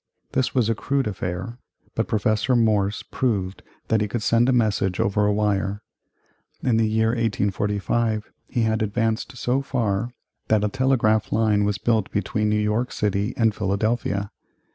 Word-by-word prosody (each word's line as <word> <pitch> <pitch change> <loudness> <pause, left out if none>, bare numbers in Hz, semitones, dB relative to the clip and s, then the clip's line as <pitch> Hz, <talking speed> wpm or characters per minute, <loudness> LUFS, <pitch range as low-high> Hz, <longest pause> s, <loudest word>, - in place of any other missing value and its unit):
This 130 - 0
was 125 -4 +3
a 115 - +2
crude 140 +4 -1
affair, 95 +3 -4 0.3
but - - -1
Professor 110 +4 +1
Morse 105 -3 +2
proved 100 -7 -2 0.3
that 110 -1 +2
he 105 - +1
could 110 +1 -3
send 120 +2 +3
a - - +4
message 105 -6 +1
over 105 +1 +2
a - - +3
wire. 105 -1 0 0.8
In 120 -3 +2
the 110 -1 +2
year 110 +1 +2
1845 110 0 -1 0.2
he 120 - 0
had 110 0 +1
advanced 110 +4 -1
so 125 +3 0
far 120 -4 -1 0.4
that 110 -1 +2
a 105 - +1
telegraph 120 -4 +1
line 105 -2 +2
was 100 -2 0
built 110 0 +1
between 105 +1 -1
New 105 - +2
York 105 +4 0
City 100 0 -1
and 115 -2 +3
Philadelphia. 100 0 -1
110 Hz, 160 wpm, -23 LUFS, 105-115 Hz, 0.8 s, a